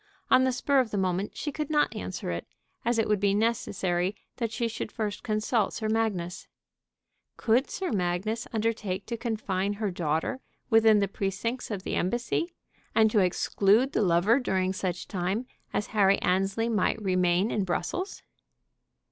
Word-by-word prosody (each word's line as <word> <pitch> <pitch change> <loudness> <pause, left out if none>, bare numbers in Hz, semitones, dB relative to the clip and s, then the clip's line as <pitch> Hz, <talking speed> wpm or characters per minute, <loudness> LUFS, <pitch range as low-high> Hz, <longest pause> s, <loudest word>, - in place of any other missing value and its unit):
On 260 - +6
the 260 - +2
spur 275 +2 +2
of 250 -4 +1
the 205 - -3
moment 190 +1 -1
she 295 - -3
could 300 +1 -4
not 300 -1 +2
answer - - -4
it, - - -4 0.4
as 240 0 +1
it 225 - +2
would 210 -1 +2
be 200 0 +2
necessary 195 -4 0 0.2
that 230 -3 -2
she 235 +1 -1
should 225 -1 -5
first 210 -2 -3
consult 215 0 0
Sir 220 - -3
Magnus. 205 -6 -1 0.9
Could 240 +4 +2
Sir 380 - -3
Magnus 195 +4 -1
undertake 215 -4 -1
to 235 - -3
confine 205 -4 -1
her 205 -1 -2
daughter 165 - -1 0.3
within 220 -2 +6
the 200 - +2
precincts 200 +6 -3
of 200 -4 -4
the - - -3
Embassy, 240 - 0 0.4
and 220 -1 +5
to 215 - +4
exclude 200 +6 +3
the - - +1
lover 190 +6 +4
during 190 -6 0
such 185 -2 -3
time 190 +6 -2 0.3
as 205 - -1
Harry 200 -2 +5
Annesley 195 +5 +1
night 220 -1 +1
remain 185 0 +2
in 205 - 0
Brussels? 190 - -3
210 Hz, 165 wpm, -28 LUFS, 190-230 Hz, 0.9 s, On